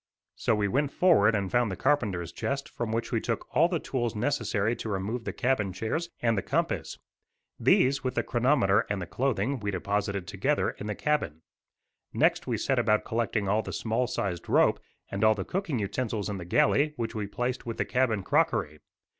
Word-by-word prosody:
So 115 - +1
we 105 -1 +1
went 140 +7 0
forward 125 - +4
and 100 -3 -1
found 120 -2 +2
the - - -3
carpenter's 95 - 0
chest, 140 0 -3
from 115 -2 -4
which 115 +1 -2
we 115 -3 +1
took 115 -2 -2
all 165 - +6
the 175 - 0
tools 120 -6 -2
necessary 115 -3 0
to 110 - -5
remove 105 +5 -3
the - - -2
cabin 120 -7 0
chairs, 115 - -3
and 115 -1 +3
the 100 - 0
compass. - - -1 0.6
These, 135 +1 +3
with 130 - -2
the - - +1
chronometer 120 -5 +2
and 105 -1 -1
the 90 - -4
clothing, 125 +5 -1
we 105 -1 -3
deposited 100 0 -2
together - - 0
in 105 - -8
the 105 - -2
cabin. 90 - -1 0.7
Next - - +2
we - - 0
set - - +1
about 105 0 +2
collecting 110 -2 -1
all 105 +3 +2
the - - -7
small 115 +3 -1
sized 100 -8 -3
rope - - +4 0.3
and 100 +2 -2
all 110 0 +5
the 95 -3 -4
cooking 180 - -2
utensils 105 0 -2
in 100 -2 -4
the 85 - -7
galley, 150 - +3
which 115 -4 -3
we 105 -2 -3
placed 125 +4 -3
with 115 - -4
the - - 0
cabin 115 -6 +1
crockery. 110 - +1
115 Hz, 195 wpm, -28 LUFS, 100-130 Hz, 0.7 s, all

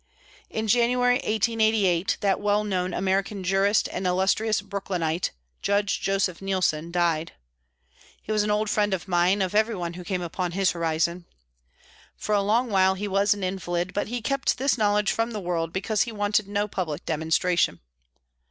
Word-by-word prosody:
In 220 0 -3
January, 245 +2 +3
1888, 215 -5 +1
that 195 -2 +1
well 205 0 +1
known 185 -3 -1
American 195 +2 -1
jurist 195 +3 +2
and 185 - -2
illustrious 195 +4 +1
Brooklynite, 185 -4 -2 0.3
Judge 200 0 0
Joseph 195 -2 0
Neilson, 185 -5 0
died. 170 -2 0 0.9
He - - -7
was 215 -1 +2
an 210 - -1
old 210 +1 +1
friend 205 -1 +1
of 185 - -8
mine, 180 +2 +2
of 185 - -3
everyone 210 -6 0
who 180 +1 -8
came 180 -1 -3
upon 175 +1 -3
his 195 0 +2
horizon. 170 +1 -1 0.9
For 210 - -2
a 205 - +3
long 225 +4 +1
while 190 -1 +4
he 205 +2 -4
was 200 +1 +2
an 200 - -6
invalid, 180 -1 -2
but 205 - -1
he 240 0 -4
kept 275 +2 0
this 275 +2 +2
knowledge 210 -2 +2
from 230 +1 -1
the 215 - -3
world, 170 -3 -2
because 200 +3 -1
he 235 - 0
wanted 205 -1 0
no 205 +1 -1
public 170 -7 -4
demonstration. 160 +2 +1
195 Hz, 165 wpm, -25 LUFS, 180-210 Hz, 0.9 s, while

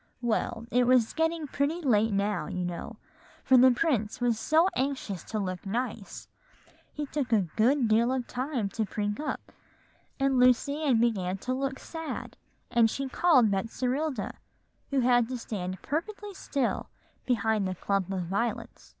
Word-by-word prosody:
"Well, 230 0 -1
it 245 0 +3
was 250 -3 +4
getting 325 0 0
pretty 285 +4 -1
late 225 -8 +2
now, 200 +1 0
you 180 0 -3
know, 180 +6 -6 0.5
for 260 - +5
the 255 +1 +8
prince 245 -6 0
was 240 -3 +1
so 320 +8 +4
anxious 260 -9 -2
to 220 - -4
look 185 -3 -3
nice, 220 0 -4 0.6
he 295 - -4
took 280 -3 -3
a 210 -5 +3
good 250 +3 +3
deal 230 +3 +3
of 260 -2 -1
time 255 -4 -2
to 220 - -2
prink 205 +1 -3
up; 300 - -4 0.7
and 270 -1 +2
Lucy 255 +4 +3
Ann 265 -7 +3
began 195 -6 +1
to 255 - 0
look 270 0 -2
sad, 325 -1 -6 0.4
and 235 -2 +4
she 270 +3 -3
called 260 -8 +4
Betserilda, 250 +5 -1 0.6
who 275 -2 +1
had 245 -1 +4
to 255 0 -4
stand 185 -5 -5
perfectly 405 +7 -4
still 280 -9 -2 0.4
behind 220 -4 +1
the 185 - -3
clump 195 0 -1
of 185 -2 -2
violets. 200 +7 -3
245 Hz, 160 wpm, -28 LUFS, 210-275 Hz, 0.7 s, the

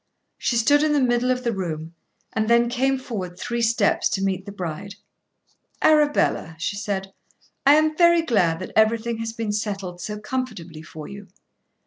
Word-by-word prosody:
She 240 - 0
stood 290 +6 +4
in 305 -1 +2
the 295 - +3
middle 245 -1 +2
of 255 0 0
the 235 - 0
room 165 -5 -4 0.4
and 220 0 0
then 235 0 +4
came 265 +2 +1
forward 195 -9 -6
three 235 0 -3
steps 230 -2 +2
to 195 - -1
meet 190 0 -2
the - - -5
bride. 190 +1 -6 0.8
"Arabella," 295 - +2
she 170 +5 -2
said, 195 -2 -4 0.5
"I 285 - +8
am 310 0 +2
very 340 0 +5
glad 185 - +2
that 185 - -6
everything 225 +1 +2
has 225 0 -3
been 225 -2 -3
settled 195 -4 -4
so 210 +2 -5
comfortably 210 -8 -5
for 160 -2 -10
you." 200 0 -10
220 Hz, 170 wpm, -23 LUFS, 190-250 Hz, 0.8 s, I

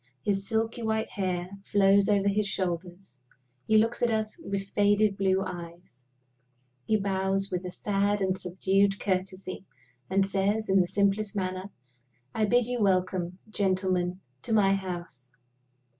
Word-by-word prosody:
His 195 +1 -1
silky 225 +1 -1
white 220 -1 -1
hair 180 -3 -2 0.2
flows 200 0 +4
over 200 -1 +3
his 200 +1 +1
shoulders; 175 -5 -4 0.4
he 220 - +4
looks 225 +2 +2
at 240 - +3
us 220 -1 -1
with 200 -10 -4
faded 205 0 +3
blue 190 -1 +1
eyes; 170 -8 -9 0.8
he 220 - +3
bows 195 0 -1
with 180 0 -2
a - - -3
sad 205 +2 0
and 190 -1 +1
subdued 195 +2 +1
courtesy, 185 -1 -3 0.5
and 195 +1 +3
says, 200 +2 0
in 190 0 +5
the 180 - 0
simplest 200 +2 0
manner, 185 0 -3 0.6
"I 220 - +1
bid 245 +2 +3
you 245 -1 -2
welcome, 185 -2 +1
gentlemen, 185 -3 0 0.2
to - - -6
my 195 -3 +4
house." 175 -10 -5
195 Hz, 145 wpm, -28 LUFS, 185-205 Hz, 0.8 s, in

